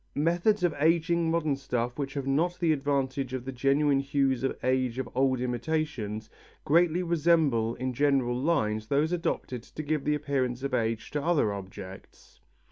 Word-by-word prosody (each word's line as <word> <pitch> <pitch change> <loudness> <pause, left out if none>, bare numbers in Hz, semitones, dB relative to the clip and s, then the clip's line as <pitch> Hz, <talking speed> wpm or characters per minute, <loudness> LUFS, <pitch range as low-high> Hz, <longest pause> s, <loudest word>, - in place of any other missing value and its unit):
Methods 175 +6 +2
of 175 -3 +2
ageing 165 +2 +2
modern 160 -3 +1
stuffs 125 -3 -2
which 140 -1 -4
have 140 -2 -3
not 165 +7 0
the 170 -3 +2
advantage 135 -2 -1
of 125 -1 -5
the 135 - -4
genuine 135 +2 +2
hues 135 -2 +1
of 135 - -1
age 130 -1 +1
of 130 - -2
old 130 0 +2
imitations, 125 -4 -2 0.4
greatly 170 +3 +3
resemble 155 -9 +2
in 130 +1 -3
general 135 -2 +2
lines 110 -7 0
those 145 +5 +1
adopted 165 -7 -2
to 155 +5 -8
give 150 -1 -2
an 150 - +3
appearance 135 -4 -2
of 140 -1 -3
age 115 -2 -1
to 150 - -1
other 145 -10 +2
objects. 95 -1 -10
135 Hz, 165 wpm, -28 LUFS, 125-155 Hz, 0.4 s, greatly